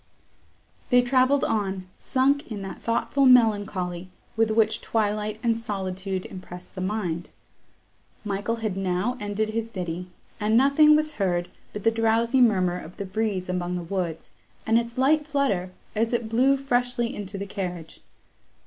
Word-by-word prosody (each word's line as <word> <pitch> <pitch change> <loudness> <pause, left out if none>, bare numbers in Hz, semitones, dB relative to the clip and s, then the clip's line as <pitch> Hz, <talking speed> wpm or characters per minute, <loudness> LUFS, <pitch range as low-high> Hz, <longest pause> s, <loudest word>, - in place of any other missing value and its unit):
They 245 0 +5
travelled 260 +2 +3
on, 195 -4 -1
sunk 275 0 +1
in 205 -2 -4
that 195 - -7
thoughtful 250 +4 +1
melancholy, 205 -7 +3 0.3
with 225 0 +2
which 220 0 +2
twilight 215 -1 -1
and 230 -1 +2
solitude 195 -4 -4
impress 180 -1 -9
the 185 - -7
mind. 185 -4 -2 1.0
Michael 205 +3 -1
had 205 -4 -1
now 190 +5 -1
ended 210 +1 -2
his 225 +1 -3
ditty, 180 -3 -4 0.3
and 215 +1 +2
nothing 280 +4 +6
was 305 0 +1
heard 175 -2 0 0.2
but 210 - -7
the 225 - +4
drowsy 230 +3 +2
murmur 185 -6 +3
of 180 +1 -11
the 200 - -4
breeze 195 -1 -2
among 180 -1 -2
the 175 - -3
woods, 170 -2 -4 0.3
and 225 +1 +4
its 235 +1 -6
light 295 +3 +3
flutter, 275 -12 0 0.3
as 225 +2 0
it 235 -2 -1
blew 260 +5 +3
freshly 245 -2 0
into 200 -1 -6
the 200 - -4
carriage. 180 -5 -6
215 Hz, 150 wpm, -25 LUFS, 185-240 Hz, 1.0 s, nothing